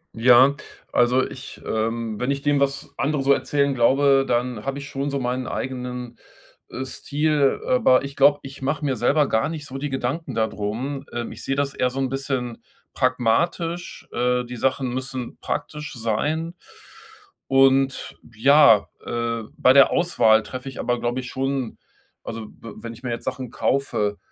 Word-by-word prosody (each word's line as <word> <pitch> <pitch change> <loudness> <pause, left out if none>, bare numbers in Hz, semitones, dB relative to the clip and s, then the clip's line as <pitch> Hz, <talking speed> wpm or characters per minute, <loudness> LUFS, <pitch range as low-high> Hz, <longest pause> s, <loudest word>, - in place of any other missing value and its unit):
Ja, 125 +4 +6 0.4
also 125 +2 +3
ich, - - -10
ähm 110 0 -2
wenn 125 +3 0
ich 140 0 -2
dem, 145 -1 +2
was 140 +1 -1
andere 145 0 0
so 135 +1 +2
erzählen 140 +1 +1
glaube, 135 +2 +4
dann 120 -1 -1
habe 135 +1 -3
ich 140 0 -8
schon 140 +1 -3
so 140 - -1
meinen 125 0 -2
eigenen, 125 -2 -5 0.5
äh, 130 - -5
Stil, 145 +1 0
aber 225 - +4
ich 140 0 -7
glaube, 145 +1 +5
ich 135 0 -10
mache 145 +2 -1
mir 135 -2 0
selber 140 +6 +2
gar 110 +7 +1
nicht 155 -3 -6
so 135 - -7
die 145 +2 -3
Gedanken 130 +2 -3
da 110 -1 +2
drum. 125 +8 -4
Ähm, 120 0 -4
ich - - -10
sehe 135 - -1
das 140 0 -1
eher 125 - +1
so 135 - -4
'n 135 -1 0
bisschen 130 -3 -3 0.3
pragmatisch. 165 +8 0
Äh, 125 +1 0
die 125 +1 -7
Sachen 130 +1 0
müssen 130 -1 -5
praktisch 150 -1 -4
sein. 150 +9 -2 0.9
Und 135 0 +3 0.2
ja, 125 -3 +6 0.2
äh 115 -1 -2
bei 130 - +5
der 135 0 +7
Auswahl 110 -10 +4
treffe 130 +3 -7
ich 135 - -10
aber, 120 0 0
glaube 120 +2 -1
ich, 125 - -8
schon 135 -2 -2 0.5
also 115 -1 -6
w 115 0 -12
wenn 115 0 -6
ich 120 +3 -15
mir 125 - -3
jetzt 115 - -5
Sachen 130 -3 -4
kaufe, 105 -8 0
130 Hz, 175 wpm, -23 LUFS, 120-140 Hz, 0.9 s, der